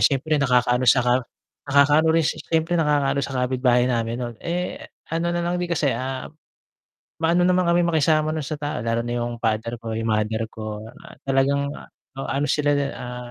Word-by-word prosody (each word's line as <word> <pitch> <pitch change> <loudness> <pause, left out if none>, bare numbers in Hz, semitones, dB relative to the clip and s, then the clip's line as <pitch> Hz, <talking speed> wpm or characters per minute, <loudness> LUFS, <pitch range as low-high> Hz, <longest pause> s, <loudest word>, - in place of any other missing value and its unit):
syempre 140 +2 -2
nakakaano 125 -1 +2
sa 125 - +6
ka 125 - +3 0.6
nakakaano 145 +3 +4
rin 165 0 +3
si - - -1
syempre, 165 +1 -1
nakakaano 145 -4 +2
sa 135 0 -4
kapitbahay 125 -1 +2
namin, 115 -2 -1
nun. 120 -1 -4
Eh, 175 +1 -3 0.3
ano 165 +1 0
na 175 0 -1
lang 175 +1 -1
din 175 - -2
kasi, 150 -5 +1
ah, 130 0 -4 1.0
maano 170 +2 +3
naman 185 0 +3
kaming 170 0 +3
makisama 155 -1 +2
nun 155 - -2
sa 155 +1 -4
tao, 145 -2 -3
lalo 115 0 0
na 120 - -2
yung 120 0 -3
father 115 +1 -1
ko, 115 -1 -5
yung 115 0 -2
mother 110 +1 0
ko. 110 -1 -6 0.2
Ah, - - -13
talagang, 140 +1 +1
ah, - - -10 0.3
oh, 135 - -4
ano 140 +2 0
sila, 145 -1 +2 0.2
ah 125 0 -7
140 Hz, 190 wpm, -23 LUFS, 120-160 Hz, 1.0 s, sa